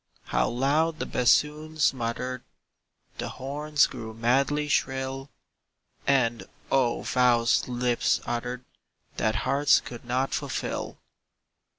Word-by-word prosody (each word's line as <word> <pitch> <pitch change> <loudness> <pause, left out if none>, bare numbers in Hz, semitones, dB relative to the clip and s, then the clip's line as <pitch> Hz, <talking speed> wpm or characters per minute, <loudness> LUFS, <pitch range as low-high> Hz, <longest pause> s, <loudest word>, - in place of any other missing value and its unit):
How - - 0
loud 150 +6 +1
the - - -3
bassoons 150 +5 +2
muttered! 125 +1 -3 0.8
The - - -3
horns 145 +2 +1
grew 110 -1 -7
madly 135 +6 +1
shrill; 135 -1 -1 0.8
And, 120 -4 +2 0.3
oh, 130 -3 +2
the - - -6
vows 120 -2 +3
lips 125 -1 +1
uttered 125 +1 -4 0.5
That 110 0 +1
hearts 140 +1 +4
could 120 -2 -9
not 125 +2 -1
fulfill. - - -3
130 Hz, 105 wpm, -27 LUFS, 120-140 Hz, 0.8 s, hearts